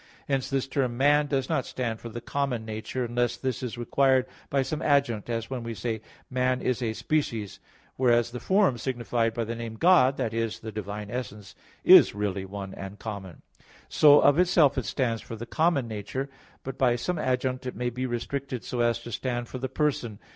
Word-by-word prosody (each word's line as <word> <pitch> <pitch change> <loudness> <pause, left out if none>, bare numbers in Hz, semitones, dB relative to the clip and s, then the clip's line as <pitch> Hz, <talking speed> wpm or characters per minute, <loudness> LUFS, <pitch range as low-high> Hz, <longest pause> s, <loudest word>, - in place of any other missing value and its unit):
Hence 135 -2 0
this 135 -1 -1
term 130 -3 -1
"man" 145 +2 +4
does 135 -2 0
not 155 -5 0
stand 115 -3 -3
for 115 - -8
the 120 +1 -7
common 125 -3 -2
nature, 110 +3 -4
unless 120 0 0
this 130 -1 -3
is 125 -2 -4
required 130 +2 +3 0.2
by 140 -1 +2
some 150 +4 -4
adjunct, 140 -7 +1
as 115 +1 -3
when 130 -2 -3
we 115 0 -5
say, 110 +2 -3 0.3
"man 130 0 0
is 125 0 -1
a 115 -2 -1
species"; 115 -7 -2 0.4
whereas 120 -2 +3
the 125 - -5
form 190 - +2
signified 120 -2 -1
by 120 - 0
the 115 +1 -4
name 115 -1 -6
"God" 140 -3 +5
that 115 -4 -2
is, 115 -1 -2
the 110 - -6
divine 105 0 -6
essence 105 -5 -6 0.3
is - - +8
really 100 -2 -2
one 95 0 -7
and 95 +1 -8
common. 100 -6 -7 0.5
So 145 -1 +7
of 145 +3 +5
itself 170 -6 +4
it - - -2
stands 115 -5 -1
for 115 - -8
the 115 +2 -7
common 155 -1 +1
nature, 115 +6 -4 0.3
but 135 0 -6
by 125 -2 +4
some 165 +7 -2
adjunct 130 -1 -1
it 125 - -5
may 125 0 -2
be 130 +2 -3
restricted 125 +1 -4
so 125 - -4
as 120 -1 +2
to 120 - -8
stand 120 +1 -3
for 130 - -6
the 130 +1 -3
person. 130 -6 -1
120 Hz, 200 wpm, -27 LUFS, 115-135 Hz, 0.5 s, is